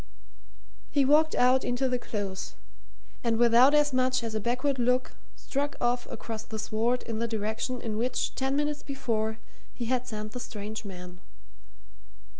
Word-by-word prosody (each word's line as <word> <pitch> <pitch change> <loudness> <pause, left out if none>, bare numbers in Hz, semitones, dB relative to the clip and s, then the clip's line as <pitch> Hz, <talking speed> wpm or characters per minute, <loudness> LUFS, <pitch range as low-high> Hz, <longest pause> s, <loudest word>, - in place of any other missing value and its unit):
He 280 -2 +3
walked 310 +3 +4
out 255 +1 +4
into 245 +2 0
the 250 -1 0
Close, 200 -5 -4 0.7
and 230 -2 +2
without 240 +4 +6
as 295 -2 +4
much 255 -1 +2
as 225 -1 -3
a 215 - 0
backward 255 +5 0
look 250 +1 +1 0.2
struck 285 +1 -2
off 245 0 +1
across 225 -1 -5
the 220 0 -6
sward 230 +3 0
in 225 -1 -4
the 235 - 0
direction 220 +3 -2
in 215 -2 -3
which, 250 +2 0
ten 265 +1 0
minutes 295 0 0
before, 220 -6 -2 0.4
he 240 - -3
had 250 +1 0
sent 215 -2 -5
the 250 - -5
strange 215 -2 -6
man. 180 -2 -9
240 Hz, 160 wpm, -28 LUFS, 220-260 Hz, 0.7 s, without